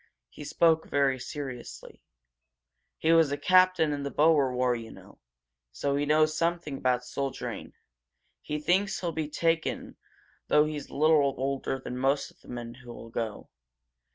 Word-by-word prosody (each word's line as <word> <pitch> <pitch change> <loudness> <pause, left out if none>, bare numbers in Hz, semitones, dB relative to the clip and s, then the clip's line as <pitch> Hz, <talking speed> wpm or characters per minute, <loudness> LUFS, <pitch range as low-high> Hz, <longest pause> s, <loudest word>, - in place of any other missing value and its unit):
He - - -10
spoke 160 +2 +2
very 135 -2 +1
seriously. 125 - -8 1.0
"He 160 - +1
was 165 -3 +4
a 145 - -1
captain 185 -1 +4
in 145 - -4
the 140 - -3
Boer 150 -3 +3
War, 125 0 +1
you 115 -1 -7
know, - - -15 0.5
so 140 - -1
he 145 +1 -1
knows 155 +1 +3
something 170 -3 -1
about 125 -1 0
soldiering. 135 +2 -5 0.7
He 150 - -4
thinks 190 +6 +1
he'll 175 -2 -1
be 155 -2 -3
taken, 165 +1 -1 0.5
though 150 0 +4
he's 150 -2 -5
a - - -11
little 145 -2 +3
older 135 0 -2
than 125 -1 -6
most 135 +2 0
of - - -28
the - - -20
men 120 -1 -7
who'll 120 -2 -10
go. 115 -2 -5
145 Hz, 155 wpm, -28 LUFS, 130-160 Hz, 1.0 s, was